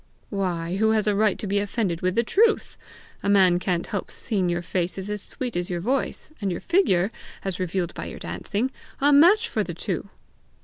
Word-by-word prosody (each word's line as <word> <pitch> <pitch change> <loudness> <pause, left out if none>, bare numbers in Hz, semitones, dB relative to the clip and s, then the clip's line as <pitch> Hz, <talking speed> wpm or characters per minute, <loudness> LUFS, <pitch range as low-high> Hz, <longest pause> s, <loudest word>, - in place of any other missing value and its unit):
"Why, 180 -3 -1
who 220 +1 +3
has 215 -1 +2
a 210 - +2
right 210 -1 +2
to - - -5
be 200 +1 +1
offended 200 -4 -1
with 185 +1 0
the 235 - +3
truth! 435 - +2 0.5
A 200 - -1
man 185 -3 +5
can't 180 -1 -1
help 200 - -4
seeing 190 -6 -1
your 175 0 -1
face 175 +1 -2
is 195 +2 -4
as 210 -1 -3
sweet 250 +2 -5
as 175 0 -2
your 175 -1 -2
voice, 260 - -2
and 195 -2 0
your 175 - -3
figure, 205 - +2 0.3
as 190 -2 -2
revealed 180 -1 -1
by - - -6
your - - -7
dancing, 235 +6 -3 0.3
a 285 +1 +4
match 380 +11 +6
for - - 0
the - - -6
two!" - - -3
200 Hz, 210 wpm, -25 LUFS, 180-225 Hz, 0.5 s, match